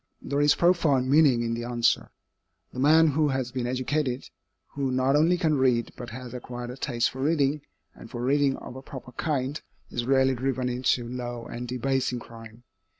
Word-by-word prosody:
There 140 +1 -1
is 145 0 +5
profound 150 -7 +2
meaning 140 -6 +5
in 115 0 -1
the 115 0 -3
answer. 120 0 +1 0.6
The - - -6
man 155 +4 +5
who 150 +1 +2
has 130 -3 -2
been 125 -1 -2
educated, 130 +1 -2 0.4
who 140 -2 -2
not 130 +2 +2
only 165 +4 +4
can 155 -5 +1
read, 125 -3 +2
but 120 - -8
has 125 +1 -8
acquired 120 0 -6
a - - -8
taste 120 -3 -1
for 130 - -7
reading, 145 -1 +1 0.3
and 115 - -13
for 120 0 -5
reading 140 +1 +2
of - - -10
a 130 - -8
proper 130 -2 -10
kind, 140 0 -2 0.3
is 120 0 -2
rarely 135 0 +4
driven 130 0 -1
into 125 -1 0
low 120 -1 -5
and 120 +1 -6
debasing 125 +1 -1
crime. 115 0 -13
130 Hz, 185 wpm, -26 LUFS, 120-140 Hz, 0.6 s, is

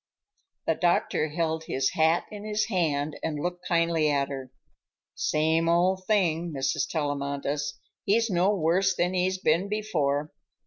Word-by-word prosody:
The - - +2
doctor 175 -3 +1
held 160 0 -2
his 130 -3 0
hat 160 +2 +2
in 210 -1 -8
his 215 +1 -1
hand 155 -6 0
and 155 -2 -2
looked 175 +3 -4
kindly 165 -2 +2
at 140 -1 +1
her. 135 -2 -6 0.6
"Same 160 +2 +1
old 185 +2 +2
thing, 175 -5 +1
Mrs. 135 +1 -1
Tellamantez. 145 -1 -2 0.3
He's 230 +3 +2
no 185 -1 +2
worse 185 +1 +2
than 180 +1 0
he's 185 +1 +1
been 185 +2 +1
before. 150 -9 -1
165 Hz, 140 wpm, -27 LUFS, 150-185 Hz, 0.6 s, The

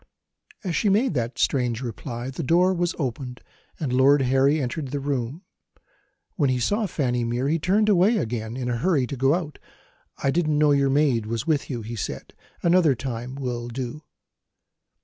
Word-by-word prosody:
As 180 -4 -2
she 210 - +2
made 215 +3 +2
that 120 -2 -2
strange 125 -2 0
reply 120 +1 -5
the 135 - -5
door 175 +5 +3
was 175 -1 -1
opened, 125 -3 -4 0.4
and 140 -6 -2
Lord 135 +2 +5
Harry 135 +4 +3
entered 140 +2 -3
the 140 +2 -3
room. 140 - -3 0.9
When 145 -6 +2
he 130 -1 +1
saw 205 - 0
Fanny 125 -8 -1
Mere 120 +3 -1
he 160 +3 +1
turned 205 +6 +2
away 205 +3 +4
again, 115 - -3
in 125 -2 -3
a 120 -1 -1
hurry, 150 -1 +2
to 140 - -5
go 135 +4 +3
out. 160 -5 -5 0.6
"I 135 - +3
didn't 155 -1 +1
know 150 0 +4
your 140 -1 +3
maid 135 -6 +2
was 115 +1 -3
with 155 -3 0
you," 120 -5 -4
he 115 +2 -6
said. 110 - -5 0.3
"Another 170 -5 +4
time 125 0 -5
will 125 -3 -4
do." 125 +4 -5
135 Hz, 180 wpm, -24 LUFS, 125-160 Hz, 0.9 s, Lord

